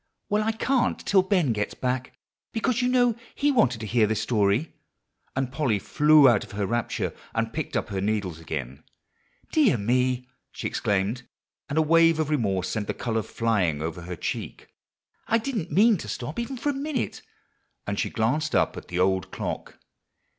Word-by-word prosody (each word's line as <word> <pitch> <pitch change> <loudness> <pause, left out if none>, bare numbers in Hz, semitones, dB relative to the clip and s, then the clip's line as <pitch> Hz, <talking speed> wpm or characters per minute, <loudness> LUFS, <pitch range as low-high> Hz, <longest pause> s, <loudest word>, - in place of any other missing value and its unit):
"Well, 210 +1 +2
I 220 +1 0
can't 255 +2 +1
till 195 -1 +5
Ben 185 - +2
gets 105 -1 -2
back, 130 0 -3 0.4
because 240 +2 0
you 250 - +2
know 245 -2 +3 0.2
he 290 0 +2
wanted 125 - +2
to - - -4
hear 110 0 +3
this 110 0 0
story;" 110 +5 +1 0.6
and 130 -1 -1
Polly 135 -7 +1
flew 150 +7 +5
out 120 -5 +4
of - - -12
her 100 0 -1
rapture, 120 +3 -1 0.2
and - - -1
picked - - -2
up - - -2
her 95 -2 -2
needle 100 -4 -1
again. 70 -5 -5 0.7
"Dear 285 - +4
me!" 125 +3 +1 0.2
she - - -7
exclaimed, 105 +5 0 0.5
and 140 - -2
a 160 - +5
wave 165 0 +4
of 155 -1 0
remorse 95 -10 0
sent 105 +2 -2
the - - -2
color 115 -2 -1
flying 100 -10 0
over 80 +2 -4
her 90 +1 -6
cheek, - - -5 0.6
"I 230 - +3
didn't 225 - -3
mean 215 +2 +5
to - - -8
stop 130 - -5
even 255 +3 -4
for 265 +5 -1
a - - +1
minute;" 280 0 -3 0.6
and 100 0 -2
she - - 0
glanced 130 +7 0
up - - +2
at - - -9
the 90 - -4
old 95 0 +1
clock. - - -5
125 Hz, 180 wpm, -26 LUFS, -, 0.7 s, till